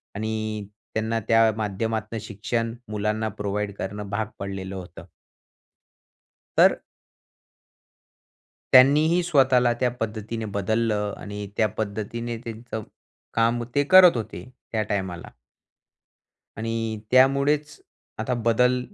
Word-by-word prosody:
आणि 110 -1 -3 0.3
त्यांना 110 +1 0
त्या 115 -1 +5
माध्यमातनं 110 +2 -2
शिक्षण 115 +2 -3 0.2
मुलांना 105 +1 -1
प्रोव्हाईड 105 0 -3
करणं 100 +1 -5
भाग 110 +1 -1
पडलेलं 95 -1 -5
होतं. 85 -2 -9 1.5
तर - - +6 2.0
त्यांनीही 150 +7 +6
स्वतःला 130 -7 +4
त्या 125 -1 +2
पद्धतीने 110 +1 -4
बदललं 105 0 0
आणि 105 0 -6
त्या 110 - +4
पद्धतीने 110 +3 -3
त्यांचं 115 -1 -7 0.5
काम 115 +1 +2
ते 145 - +4
करत 180 -3 +7
होते 95 -5 -6 0.3
त्या 110 -1 0
टायमाला. 95 -4 -3 1.3
आणि 115 -1 -2
त्यामुळेच 140 +3 +3 0.4
आता 125 +3 -1
बदल 125 +2 +3
110 Hz, 100 wpm, -24 LUFS, 105-120 Hz, 2.0 s, करत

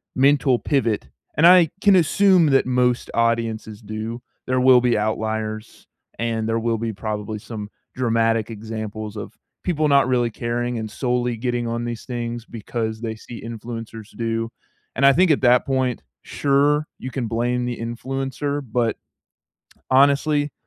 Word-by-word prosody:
mental 135 -1 +3
pivot. 120 -7 0 0.3
And 165 +3 +6
I 175 -3 +7
can 200 -2 +6
assume 180 0 +4
that 135 -1 +3
most 125 -1 +1
audiences 115 -2 -1
do. 110 +3 -5 0.3
There 130 0 +1
will 125 -1 +6
be 120 -3 +2
outliers, 110 0 -3 0.3
and 115 -1 -1
there 115 0 +1
will 115 0 0
be 115 0 -3
probably 105 0 -4
some 105 -1 -7 0.3
dramatic 115 -2 +1
examples 110 -1 -6
of - - -7 0.3
people 155 -4 +1
not 140 -3 +4
really 120 -2 +2
caring 120 +1 -2
and 110 - -5
solely 125 0 -1
getting 120 0 -2
on 115 +1 -2
these 120 -1 -5
things 120 -1 -4
because 110 0 -4
they 110 -1 -3
see 115 +1 -10
influencers 115 -1 -8
do. 115 0 -2 0.5
And 135 - -1
I 140 - +7
think 180 +2 +4
at 140 - +2
that 125 -1 +4
point, 130 -3 0 0.2
sure, 145 +2 +1
you 130 - -5
can 125 -4 -3
blame 120 +2 -1
the 120 -1 -3
influencer, 135 +4 -3
but, 120 -2 +1 1.0
honestly, 140 +2 +3
120 Hz, 150 wpm, -22 LUFS, 115-135 Hz, 1.0 s, I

